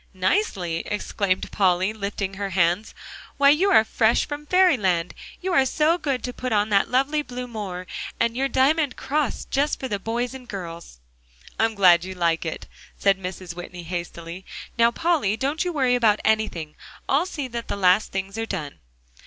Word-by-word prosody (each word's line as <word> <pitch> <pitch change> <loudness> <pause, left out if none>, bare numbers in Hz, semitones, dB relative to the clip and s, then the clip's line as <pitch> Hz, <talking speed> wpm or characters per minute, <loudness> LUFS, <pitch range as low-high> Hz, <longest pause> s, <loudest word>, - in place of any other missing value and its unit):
"Nicely?" 185 - 0
exclaimed 200 -2 -1
Polly, 190 0 +2
lifting 200 -2 -4
her 200 0 -4
hands, 180 +3 +1 0.4
"why 280 0 +6
you 360 +7 +3
are 220 - +6
fresh 225 +1 +2
from 295 0 -6
fairyland. 210 - +3 0.3
You 370 0 -2
are 270 - +5
so 310 +6 +2
good 275 -5 -2
to 250 - -4
put 255 0 -4
on 210 0 +2
that 200 -1 +3
lovely 275 +4 +2
blue 250 -3 -6
moire 200 -6 -6 0.3
and 230 0 +1
your 270 +2 +1
diamond 275 +1 +2
cross, 295 +1 -2
just 285 +2 0
for 260 - -3
the 205 -4 -2
boys 235 +5 -2
and 255 -2 -10
girls." 170 - -8 0.6
"I 225 - +5
am 225 -1 -2
glad 180 -4 +6
you 185 0 -6
like 170 -1 0
it," 160 - -5 0.3
said 195 -1 +2
Mrs. 185 -1 -6
Whitney 175 0 -8
hastily. 170 +1 -6 0.3
"Now, 230 0 +5
Polly, 260 - +1
don't 285 +6 -1
you 360 - -2
worry 265 -6 +2
about 225 -4 +3
anything; 215 -8 0 0.3
I'll 295 +7 +2
see 290 -7 -4
that 235 -1 -5
the - - -2
last 185 +2 +3
things 195 +2 -4
are 225 - -2
done." 150 - -5
220 Hz, 180 wpm, -24 LUFS, 185-270 Hz, 0.6 s, why